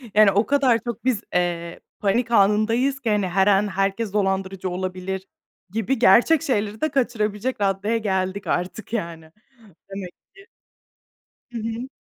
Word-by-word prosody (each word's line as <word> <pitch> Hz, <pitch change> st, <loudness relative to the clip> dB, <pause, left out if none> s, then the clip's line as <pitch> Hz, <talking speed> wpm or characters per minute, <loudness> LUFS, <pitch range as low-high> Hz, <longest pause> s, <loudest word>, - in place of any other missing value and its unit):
yani 210 Hz, -2 st, +7 dB
o 205 Hz, +3 st, +2 dB
kadar 270 Hz, -5 st, +3 dB
çok 235 Hz, 0 st, -5 dB
biz, 235 Hz, -5 st, +1 dB
eee, 170 Hz, -1 st, -1 dB, 0.2 s
panik 230 Hz, +4 st, 0 dB
anındayız 225 Hz, +6 st, +3 dB
ki 235 Hz, -4 st, -2 dB
hani, 205 Hz, -3 st, +1 dB
her 190 Hz, +2 st, +2 dB
an 205 Hz, +1 st, +4 dB
"Herkes 195 Hz, +2 st, -1 dB
dolandırıcı 195 Hz, -2 st, -1 dB
olabilir," 185 Hz, +1 st, -4 dB, 0.4 s
gibi 225 Hz, +6 st, -1 dB
gerçek 245 Hz, +9 st, +5 dB
şeyleri 215 Hz, -7 st, -2 dB
de 310 Hz, -, +1 dB
kaçırabilecek 235 Hz, -3 st, -1 dB
raddeye 200 Hz, +3 st, +1 dB
geldik 190 Hz, -2 st, -2 dB
artık, 185 Hz, +6 st, -3 dB
yani 165 Hz, -6 st, -4 dB, 0.6 s
demek 195 Hz, -2 st, -6 dB, 0.2 s
ki. 390 Hz, 0 st, -17 dB, 1.0 s
Hı 235 Hz, -, -6 dB
hı. 230 Hz, +3 st, -4 dB
205 Hz, 140 wpm, -23 LUFS, 190-230 Hz, 1.0 s, yani